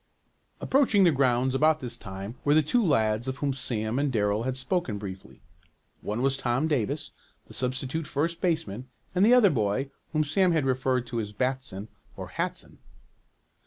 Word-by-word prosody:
Approaching 260 -7 +3
the 175 - +6
grounds 130 -2 +2
about 155 +3 +3
this 120 -4 -4
time 100 -1 -7
were 145 +1 +3
the 155 - +5
two 235 +11 +2
lads 115 - +1
of 130 0 -3
whom 140 +1 -1
Sam 120 -2 -2
and 145 -1 +1
Darrell 105 -2 +1
had 130 +2 -2
spoken 130 - -1
briefly. 95 -2 -9 0.6
One 110 +4 -3
was 135 0 +2
Tom 130 +4 0
Davis, 130 -10 -1 0.3
the - - -15
substitute 130 +4 -2
first 165 +5 -1
baseman 130 - -1 0.3
and 180 +1 +3
the 235 +4 +7
other 215 -7 +6
boy 120 +3 -1 0.2
whom 155 -1 +2
Sam 180 +4 +2
had 155 -4 +1
referred 130 -1 0
to 120 -1 -3
as 105 -2 -4
"Batson" 125 -4 -3 0.3
or - - -7
"Hatson." - - -4
130 Hz, 170 wpm, -27 LUFS, 115-155 Hz, 0.6 s, the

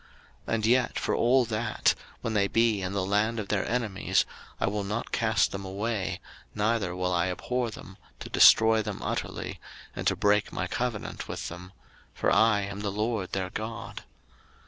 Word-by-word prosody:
03:026:044 - - -1
And 110 -1 -1
yet 125 +1 +2
for - - -1
all 125 +1 +4
that, 110 -1 +1 0.3
when 115 - -2
they 100 -2 +3
be 115 -2 +2
in 95 +1 -3
the 100 -2 0
land 105 +4 +1
of 100 - -5
their 100 -3 0
enemies, 115 -5 +1 0.3
I - - +1
will 100 +1 -1
not 105 +4 -3
cast 115 -2 +2
them 100 0 -5
away, 95 -1 -2 0.4
neither 105 -4 0
will 90 0 -1
I 85 0 +2
abhor 125 +6 -2
them, 95 -3 -11 0.2
to - - -7
destroy 110 0 +6
them - - -5
utterly, - - -4 0.4
and - - -2
to - - +3
break 105 0 +2
my 90 - -2
covenant 120 +2 -3
with - - -5
them: 90 +2 -10 0.4
for - - +1
I 110 -2 +4
am 100 0 -5
the 105 -1 -2
LORD 105 -1 -2
their 95 -1 -2
God. 115 +2 -6
105 Hz, 180 wpm, -28 LUFS, 95-115 Hz, 0.4 s, destroy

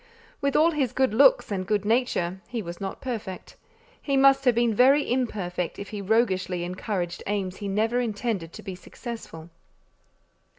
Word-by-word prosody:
With 280 0 0
all 325 +2 +5
his 270 -6 -1
good 260 -5 +2
looks 390 - +5
and 190 -2 -1
good 205 0 0
nature, 210 -6 0
he 235 -3 -4
was 170 +1 -8
not 195 - -5
perfect; 220 -8 -6 0.5
he 275 -2 0
must 275 0 +5
have 250 -2 +4
been 235 -1 +2
very 270 +6 +5
imperfect 195 -9 -2
if 200 - -7
he 210 -2 -5
roguishly 190 -4 +1
encouraged 180 -1 -3
aims 190 -2 -2
he 205 - -5
never 220 +5 +1
intended 215 -6 -2
to - - -10
be 190 -1 -5
successful. 180 -4 -9
215 Hz, 165 wpm, -26 LUFS, 185-250 Hz, 0.5 s, all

